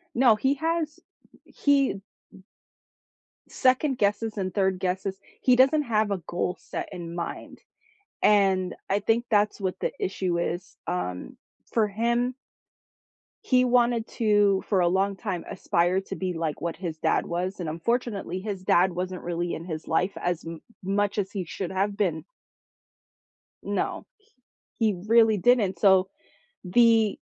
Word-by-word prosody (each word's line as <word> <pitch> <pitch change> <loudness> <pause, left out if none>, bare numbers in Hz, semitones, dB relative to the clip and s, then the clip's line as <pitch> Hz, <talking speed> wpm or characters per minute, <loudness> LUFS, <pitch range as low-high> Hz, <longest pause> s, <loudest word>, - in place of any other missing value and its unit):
No, 240 -2 +5
he 265 +6 +2
has 320 0 -2 0.4
he 275 -7 +1 1.5
second-guesses 245 -5 +1
and 185 -2 -2
third-guesses. 190 0 -1 0.2
He 255 - +5
doesn't 270 +4 +4
have 215 -4 +1
a 200 - 0
goal 180 +1 -2
set - - -6
in 170 -3 -7
mind, 170 -1 -6 0.6
and 190 -3 +3 0.2
I 195 - +3
think 225 +3 +1
that's 210 -1 +2
what 185 -2 -2
the - - -1
issue 185 - -1
is. 175 +1 -3
Um, 90 0 -4 0.4
for 220 -2 +2
him 235 +4 0 1.1
he 255 -1 +4
wanted 240 -2 +2
to, 205 -3 +2
for 195 - +2
a 175 - +3
long 195 +3 +1
time, 180 -2 -4
aspire 185 -1 +1
to - - -7
be 185 -1 -3
like 165 -3 -3
what 170 -1 -3
his 170 -4 -5
dad - - +1
was, 180 +3 -3
and 170 -3 -3
unfortunately 200 +1 -2
his 195 -1 -5
dad 185 0 +4
wasn't 180 +1 -4
really 175 0 -3
in 165 - -6
his 160 -3 -6
life 180 +4 0
as 175 -2 -2
m 165 -1 -7 0.2
much 200 +2 0
as 200 0 -2
he 190 -4 -4
should 180 +2 -5
have 195 +2 -1
been. 170 -6 -1 1.4
No, - - -2
he 410 - -33 0.5
he 215 -6 +1
really 225 -1 +5
didn't, 205 -3 +2
so 190 0 +5 0.6
the 225 +2 +4
195 Hz, 145 wpm, -26 LUFS, 180-230 Hz, 1.5 s, No